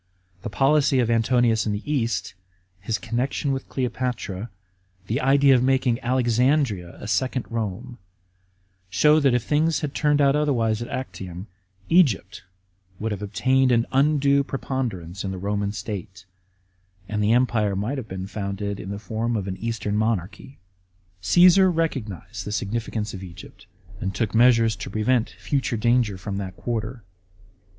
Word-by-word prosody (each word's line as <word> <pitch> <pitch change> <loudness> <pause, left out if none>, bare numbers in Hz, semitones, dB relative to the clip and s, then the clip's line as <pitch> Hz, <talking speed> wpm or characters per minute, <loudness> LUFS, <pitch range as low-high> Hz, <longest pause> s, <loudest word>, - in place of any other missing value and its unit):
The - - -5
policy 140 +4 +3
of 120 -2 +2
Antonius 115 -1 +2
in 105 - 0
the 105 - -4
East, 115 -7 -1 0.5
his 110 +4 -2
connection 125 +5 -2
with 135 -1 -4
Cleopatra, 120 -5 -3 0.6
the 115 +8 -1
idea 140 +1 +5
of 125 - +4
making 130 -2 +2
Alexandria 125 - +1
a - - -7
second 125 +5 0
Rome, 115 +1 -4 0.9
show 150 +12 +4
that 135 -4 +3
if 125 - 0
things 155 +3 +1
had 145 -3 -3
turned 150 -1 +2
out 140 -1 +4
otherwise 120 -7 +1
at 120 - -4
Actium, 95 -9 -6 0.4
Egypt 140 - +2 0.6
would 110 +1 -2
have 105 -1 -4
obtained 130 +6 +2
an 115 -1 +3
undue 140 0 +3
preponderance 110 -11 -4
in 95 - -3
the 95 - -4
Roman 100 +1 -2
State, 95 -3 -7 0.8
and 105 -1 -1
the 105 +2 +3
empire 115 -5 +2
might 115 +9 -2
have 115 - -8
been 95 -1 -5
founded 100 0 -4
in 95 - -7
the 100 - -4
form 115 +3 -2
of 100 -2 -4
an 95 -1 -4
Eastern 115 -2 -3
monarchy. 110 +4 -2 0.6
Caesar 180 - +6
recognised 135 - -3
the 105 - -6
significance 110 0 -3
of 95 - -7
Egypt, 90 +2 -12 0.3
and 95 -1 -3
took 110 -4 -1
measures 115 -1 +4
to - - -6
prevent 110 +3 +1
future 135 -4 -1
danger 120 -3 +2
from 95 +1 -5
that 95 -2 -6
quarter. 115 0 -4
115 Hz, 150 wpm, -24 LUFS, 100-130 Hz, 0.9 s, Caesar